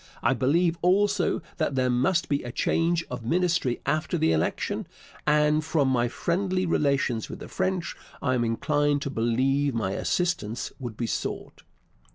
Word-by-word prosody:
I 120 - +4
believe 165 +7 +2
also 200 +2 +2
that 155 -4 0
there 130 -1 +2
must 140 +8 +2
be 145 -1 0
a 120 - -6
change 165 +6 +1
of 125 -2 -5
Ministry 170 -2 +1
after 155 0 0
the 80 - +2
election, 80 0 -1 0.4
and, 150 +1 +3
from 155 -4 +1
my 120 -2 +2
friendly 185 +7 -1
relations 140 -8 +1
with - - -6
the - - -9
French, 185 -2 -2 0.2
I 130 -2 0
am 120 -2 +1
inclined 145 +5 +1
to 140 - -3
believe 130 +4 +1
my 105 -4 -1
assistance 120 - -1
would 120 -5 -6
be 120 - -1
sought. 115 - -4
145 Hz, 160 wpm, -26 LUFS, 120-170 Hz, 0.4 s, I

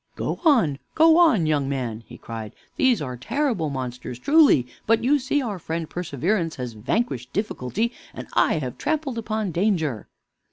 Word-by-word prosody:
"Go - - -3
on, 225 - +3 0.2
go 325 +1 +6
on, 250 - +5
young 145 -3 +1
man!" 120 -5 -3
he - - -11
cried. 110 -2 -8 0.2
"These 255 - +2
are 125 -3 -5
terrible 210 - -1
monsters 125 -2 -5
truly, 280 - +5 0.2
but 225 +1 +3
you 285 +4 +3
see 275 +2 0
our 205 -6 -4
friend 165 0 -4
Perseverance 170 - -1
has 125 -2 -5
vanquished 125 - -2
Difficulty, 210 - -2 0.2
and - - -8
I - - +3
have 130 -6 -4
trampled 295 -6 -1
upon 215 -3 -2
Danger." 165 - 0
175 Hz, 160 wpm, -24 LUFS, -, 0.2 s, go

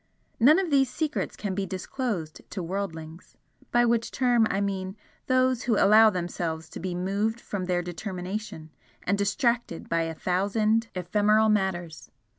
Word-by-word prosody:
None 285 +8 +7
of 375 -4 -1
these 270 -2 +4
secrets 300 +3 -2
can 205 -3 -4
be 195 0 -2
disclosed 190 - -4
to 190 - -5
worldlings 165 -3 -6 0.3
by 240 0 +4
which 235 -1 +1
term 245 -4 +2
I 195 - 0
mean 195 0 -3 0.3
those 255 -1 +2
who 230 -4 +2
allow 215 +2 +7
themselves 170 -4 -3
to - - -8
be 180 0 -4
moved 200 +5 -1
from 200 -5 -4
their 180 -1 0
determination, 180 -1 -6 0.3
and 200 - +1
distracted 220 -1 -1
by 165 0 +1
a 165 0 -3
thousand 210 +6 +1
ephemeral 210 +4 +2
matters. 185 -6 -1
200 Hz, 150 wpm, -27 LUFS, 180-225 Hz, 0.3 s, None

